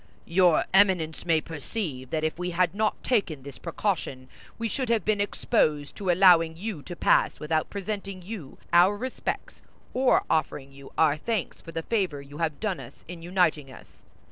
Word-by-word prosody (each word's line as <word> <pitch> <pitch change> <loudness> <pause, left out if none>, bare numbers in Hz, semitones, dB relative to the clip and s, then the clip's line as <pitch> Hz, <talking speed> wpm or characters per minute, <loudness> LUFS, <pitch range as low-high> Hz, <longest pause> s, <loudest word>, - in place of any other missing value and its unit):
"Your 175 -2 +4
Eminence 180 -5 +3
may 160 -2 +3
perceive 150 - -5
that 155 -1 -2
if 155 +2 -2
we 180 0 -2
had 180 +1 +1
not 215 +1 -1
taken 180 - 0
this 135 -2 -10
precaution, 135 -11 -3 0.3
we 230 - -2
should 255 +2 -3
have 230 -2 +1
been 210 -1 +2
exposed 155 -8 0
to 195 -3 -3
allowing 170 -3 +5
you 195 -4 -5
to 175 +4 -8
pass - - +2
without 155 +1 -1
presenting 195 -2 -5
you 180 -8 -8 0.2
our 180 +4 +6
respects 255 +3 -4 0.3
or 255 0 +3
offering 145 -3 -1
you 135 0 -13
our 155 -2 +4
thanks 215 +3 -3
for 165 - -10
the 165 0 -4
favor 190 -10 -1
you 140 +1 -11
have 160 -3 -1
done 210 -5 -2
us - - -12
in 175 0 -8
uniting 165 -6 +1
us. - - -16
175 Hz, 175 wpm, -27 LUFS, 155-200 Hz, 0.3 s, our